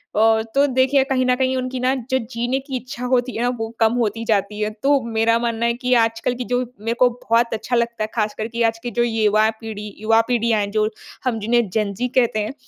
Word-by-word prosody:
अ, 220 +1 +4
तो 280 +1 +5
देखिए 265 +1 +3
कहीं 265 -1 0
न 250 0 +3
कहीं 260 0 0
उनकी 255 0 -3
ना 255 +1 +2 0.2
जो 260 - +3
जीने 245 +2 -1
की 270 0 -7
इच्छा 250 0 -7
होती 250 0 0
है 230 - -2
ना 245 - +2
वो 225 - -3
कम 225 0 +4
होती 230 -2 -1
जाती 210 -1 0
है। 210 - 0
तो 280 0 +4
मेरा 230 0 +2
मानना 235 -1 -1
है 235 - +2
कि 250 +1 -1
आजकल 225 +2 -1
की 250 - -4
जो 245 - +2 0.2
मेरे 225 +2 -1
को 250 -1 +6
बहुत 235 -1 0
अच्छा 225 +3 -2
लगता 235 -1 0
है - - -1
खासकर 215 0 -1
कि 235 0 -4
आज 225 0 +1
की 240 - -4
जो 240 +2 +1
युवा 220 -2 +2
पीढ़ी 210 -1 -6
युवा 225 +1 +4
पीढ़ियाँ 235 -3 +1
हैं 200 0 -3
जो, 215 0 +1 0.4
हम 240 -3 0
जिन्हें 230 0 +1
जेन-ज़ी 210 +3 -1
कहते 235 -3 +3
हैं, 215 +4 -3
235 Hz, 235 wpm, -21 LUFS, 220-250 Hz, 0.4 s, को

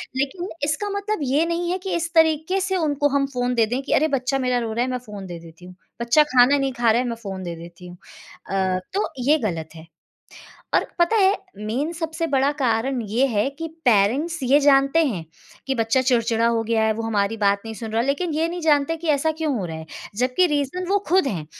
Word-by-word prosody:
लेकिन 285 +8 -2
इसका 300 +8 -1
मतलब 405 +1 -2
ये 300 +4 +3
नहीं 340 +1 -2
है 370 - 0
कि 380 - -2
इस 340 0 -3
तरीके 320 +3 +3
से 380 0 -1
उनको 290 -3 +1
हम 275 - +1
फ़ोन 245 0 -1
दे 230 -2 +4
दें 245 +5 -2
कि - - -2
अरे! 310 - +3
बच्चा 270 -1 -1
मेरा 250 -1 +1
रो 225 -2 -3
रहा 240 +2 0
है 255 - -3
मैं 250 - -1
फ़ोन 205 -2 -8
दे 175 -2 -7
देती 165 +1 -14
हूँ, 180 0 -12 0.3
बच्चा 235 +6 +4
खाना 260 0 +4
नहीं 275 -1 0
खा 240 -2 +2
रहा 235 +3 +2
है 250 - -3
मैं 235 - -3
फ़ोन 190 -1 -5
दे 170 -1 -5
देती 170 +2 -12
हूँ 175 0 -11 0.5
अ, 190 -1 0
तो 405 +2 0 0.2
ये 310 - +6
गलत 160 -3 -5
है। 160 0 -12 0.9
और - - +4
पता 345 +6 +3
है 395 -1 +4 0.2
मेन, 235 +10 -3
सबसे 325 -1 -3
बड़ा 275 -1 +2
कारण 255 -2 0
ये 245 +6 +2
है 225 0 0
कि 325 - -4 0.2
पेरेंट्स 250 +10 +2
ये 265 +3 +4
जानते 275 +3 +4
हैं 185 - -3 0.4
कि 270 - 0
बच्चा 225 +2 +1
चिड़चिड़ा 230 -3 +2
हो 230 -1 +1
गया 225 0 0
है, 220 - +2
वो 225 +1 -5
हमारी 220 -1 0
बात 200 -1 +2
नहीं 225 0 -6
सुन 225 0 -7
रहा, 225 +1 +1
लेकिन 285 +6 -1
ये 325 +2 +1
नहीं 350 +1 -5
जानते 305 0 +2
की 325 0 -6
ऐसा 300 +2 +2
क्यों 310 -3 0
हो 190 - -3
रहा 160 -1 -6
है? 160 0 -9 0.3
जबकि 255 - +2
रीज़न 295 +4 -2
वो 405 +1 +3
खुद 370 -2 +3
हैं, 175 - -3
265 Hz, 235 wpm, -22 LUFS, 220-315 Hz, 0.9 s, ये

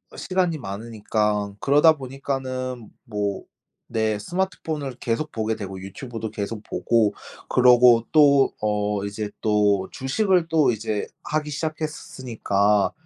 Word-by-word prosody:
시간이 180 -4 0
많으니까 105 -2 -2
그러다 150 +6 +5
보니까는 130 -3 -4
뭐 105 -3 -3 0.4
네, 110 -1 0
스마트폰을 155 - -3
계속 150 +7 -2
보게 110 0 -1
되고 95 -3 -7
유튜브도 110 +4 -6
계속 105 +1 -4
보고. 115 -3 +1 0.3
그러고 125 -2 +6
또 140 -3 +5
어 105 -1 0
이제 105 +1 -4
또 105 -3 +2
주식을 180 +5 +1
또 160 -5 +3
이제 105 -2 -3 0.2
하기 150 0 -2
시작했으니까. 130 -10 -1
115 Hz, 260 characters per minute, -24 LUFS, 105-145 Hz, 0.4 s, 그러고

